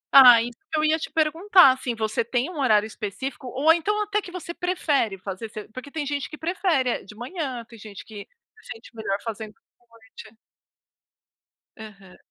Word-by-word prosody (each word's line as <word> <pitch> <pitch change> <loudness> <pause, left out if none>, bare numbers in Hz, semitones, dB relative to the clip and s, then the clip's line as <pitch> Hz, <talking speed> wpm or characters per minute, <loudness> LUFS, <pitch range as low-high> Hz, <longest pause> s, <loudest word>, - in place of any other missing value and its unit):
Ah, 250 -4 +10
isso 240 +1 -6 0.2
que 320 - 0
eu 305 - +1
ia 315 +1 +2
te - - -5
perguntar, 325 +1 +5
assim, 255 -2 -3
você 220 0 -1
tem 245 +3 -1
um 345 -5 -7
horário 215 -6 +3
específico, 220 +5 -6
ou 280 +6 +4
então 415 +6 -1
até 420 0 -1
que 360 - -10
você 345 -1 -7
prefere 300 - 0
fazer? 195 +3 -7
Se 215 -1 -8
porque 255 +5 -9
tem 295 0 -4
gente 285 0 -3
que 305 - -9
prefere 335 -6 0
é - - -16
de 210 - -13
manhã, 255 - -5
tem 230 -2 -14
gente 205 -2 -10
que 210 -2 -10 0.3
se - - -11
sente 225 +1 -16
melhor 215 -3 -2
fazendo 220 -2 -6
à - - -38 0.4
noite. 220 0 -15 1.4
Aham. 195 -4 -13
255 Hz, 190 wpm, -24 LUFS, 220-320 Hz, 1.4 s, Ah